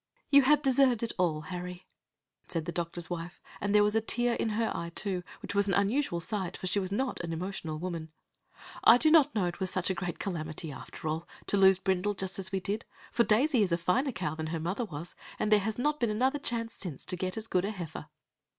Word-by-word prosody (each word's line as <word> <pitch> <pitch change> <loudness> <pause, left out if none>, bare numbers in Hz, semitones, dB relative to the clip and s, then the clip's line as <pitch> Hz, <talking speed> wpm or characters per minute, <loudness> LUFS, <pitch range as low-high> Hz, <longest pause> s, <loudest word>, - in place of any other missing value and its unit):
"You 280 0 +9
have 295 +2 +4
deserved 260 -3 +4
it 230 - 0
all, 160 -4 +1
Harry," 180 +2 -6 0.6
said 165 -3 -3
the 175 - -3
doctor's 170 0 -4
wife, 175 0 -5 0.2
and 205 - -1
there 210 - +7
was 210 +1 +2
a 225 - +4
tear 240 +2 +1
in 230 - 0
her 225 -1 +1
eye, 170 0 -4
too, 190 -3 -1 0.2
which - - -4
was 200 0 +3
an 195 - +2
unusual 200 -1 +1
sight, 190 0 -3
for - - -7
she 185 +2 +1
was 190 -1 -3
not 255 +5 -1
an 170 -1 -4
emotional 165 -2 -4
woman. 165 -2 -5 0.7
"I 230 - +9
do 310 +4 +3
not 295 -4 +5
know 205 - +2
as 175 - +1
it 175 - -9
was 190 -1 0
such 185 0 0
a - - +1
great 180 -1 -4
calamity, 160 -4 -3
after 150 - -8
all, 160 +2 -2 0.2
to - - 0
lose 190 -1 +6
Brindle 190 +2 0
just 190 0 -3
as 190 -1 -4
we 195 - 0
did, 205 +4 -2 0.3
for 235 - +3
Daisy 240 +4 +3
is 195 -4 +2
a 170 - +3
finer 230 - +1
cow 185 -9 -3
than 160 0 -4
her 165 +1 -2
mother 190 +9 -2
was, 165 -2 -7 0.2
and 215 - -1
there 210 - +7
has 215 +2 -2
not 295 +4 0
been 235 - +1
another 260 +7 +1
chance 230 -3 -3
since 170 -9 -6
to 185 - -1
get 185 +3 -3
as 220 - -3
good 185 -5 +1
a 200 - -1
heifer." 170 -7 -6
190 Hz, 240 wpm, -30 LUFS, 175-225 Hz, 0.7 s, You